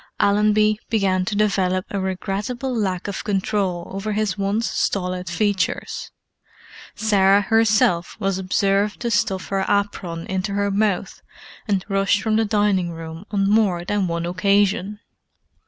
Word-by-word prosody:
Allenby 210 +1 +3
began 190 -4 +1
to 205 - -2
develop 190 -3 +1
a 200 - -2
regrettable 200 +7 -3
lack 190 -5 -1
of 200 - -4
control 195 -3 -1
over 195 +2 -3
his 210 -2 0
once 205 +3 -1
stolid 180 -2 -2
features; 200 +3 -1 0.9
Sarah 200 -2 +4
herself 210 -5 +2
was 195 -1 -1
observed 195 +2 +1
to 235 -1 -1
stuff 205 -3 0
her 195 -1 0
apron 185 -5 -1
into 190 +2 -2
her 200 0 0
mouth 200 -2 -1 0.5
and 195 -3 0
rush 195 0 +2
from 215 +1 0
the 225 0 +2
dining 205 -4 +1
room 165 +2 -8
on 195 -2 +1
more 200 -5 +2
than 205 -1 0
one 170 0 -2
occasion. 200 +2 +1
200 Hz, 140 wpm, -22 LUFS, 185-210 Hz, 0.9 s, Sarah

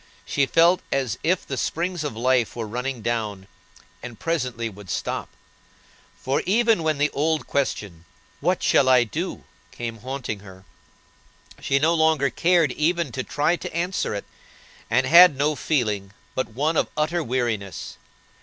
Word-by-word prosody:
She 140 -1 +1
felt 170 +5 +4
as 130 -5 -1
if 180 +3 +1
the 135 - -4
springs 170 +6 -2
of 145 -6 -4
life 125 -1 +1
were 115 -2 -3
running 125 +2 -4
down, 105 -5 -2 0.6
and 120 -3 -9
presently 125 -8 -2
would 100 -3 -11
stop; - - -3 0.9
for, 135 +1 0
even 225 -1 +3
when 155 -2 0
the 145 +1 +1
old 155 +2 0
question, 100 -11 -2 0.3
"What 180 +5 0
shall 130 - +4
I 125 -2 +6
do?" 110 - -5 0.3
came 115 -1 -6
haunting 130 -2 -5
her, 95 -2 -14 0.9
she 135 - +1
no 160 +4 +3
longer 160 -4 +2
cared 170 -5 +3
even 165 0 0
to 130 - -3
try 150 +6 +1
to - - -7
answer 175 - -1
it, 100 - -5 0.6
and 130 - +2
had 170 +1 +8
no 150 +2 +1
feeling 105 -10 -1 0.2
but 130 - -2
one 150 +8 0
of - - +1
utter 160 +3 0
weariness. 115 -7 -3
135 Hz, 155 wpm, -24 LUFS, 115-160 Hz, 0.9 s, had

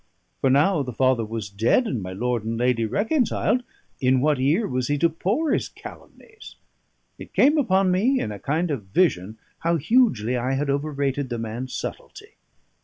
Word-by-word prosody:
For 135 - +2
now 150 +5 +3
the 130 -2 -4
father 130 -1 +2
was 110 -1 -5
dead, 115 - +2
and 125 - -2
my 90 0 -6
lord 120 +3 -2
and 115 +1 -3
lady 120 -1 +1
reconciled, 225 - 0 0.4
in 130 -1 +3
what 145 0 +1
ear 155 - +2
was 125 -1 -2
he 145 - 0
to 170 +4 +3
pour 220 - -1
his - - 0
calumnies? 435 -1 -13 0.6
It - - -12
came 295 +3 +5
upon 190 -7 +2
me 240 +9 +2
in 105 - -3
a 100 - -7
kind 160 - -1
of 120 -9 -4
vision 100 - 0 0.2
how 170 +1 +1
hugely 145 - +2
I 125 +2 -1
had 140 +1 0
overrated 140 -2 -2
the 120 - -3
man's 115 +3 -5
subtlety. - - -7
135 Hz, 180 wpm, -23 LUFS, 120-185 Hz, 0.6 s, came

